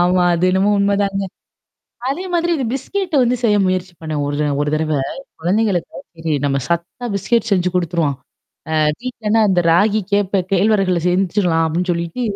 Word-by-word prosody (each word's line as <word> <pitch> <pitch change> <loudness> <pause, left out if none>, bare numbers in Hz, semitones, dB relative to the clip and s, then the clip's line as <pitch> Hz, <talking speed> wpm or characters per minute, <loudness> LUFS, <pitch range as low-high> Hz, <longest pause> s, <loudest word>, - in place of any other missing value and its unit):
ஆமா. 180 0 +3
அது 170 +2 0
என்னமோ 190 +2 +2
உண்மைதாங்க. 200 0 +1 0.9
அதே 350 +7 -3
மாதிரி 345 0 +1
இந்த 265 - -2
பிஸ்கட் 360 +5 -3
வந்து 245 +1 +2
செய்ய 210 -2 +4
முயற்சி 185 -1 -1
பண்ணேன். 155 -2 -3
ஒரு 145 +1 -1 0.2
ஒரு 150 - -1
தடவை. 155 -1 0 0.4
குழந்தைகளுக்காக 190 +3 0 0.2
சரி, 160 -1 -3
நம்ம 140 0 +1
சத்தா 170 +8 -3
பிஸ்கட் 225 +3 0
செஞ்சு 180 -2 +2
கொடுத்துருவோம். 165 -5 0 0.6
ஆஹ் 155 -1 +3
வீட்லன்னா 225 -3 0
அந்த 185 -2 +3
ராகி, 205 +5 +3
கேப்பை, 200 -1 +2
கேழ்வரகுல 195 -3 +2
செஞ்சுடலாம் 180 -2 +1
அப்படின்னு 175 +3 -1
சொல்லிட்டு 170 +8 -4
185 Hz, 150 wpm, -18 LUFS, 170-210 Hz, 0.9 s, செய்ய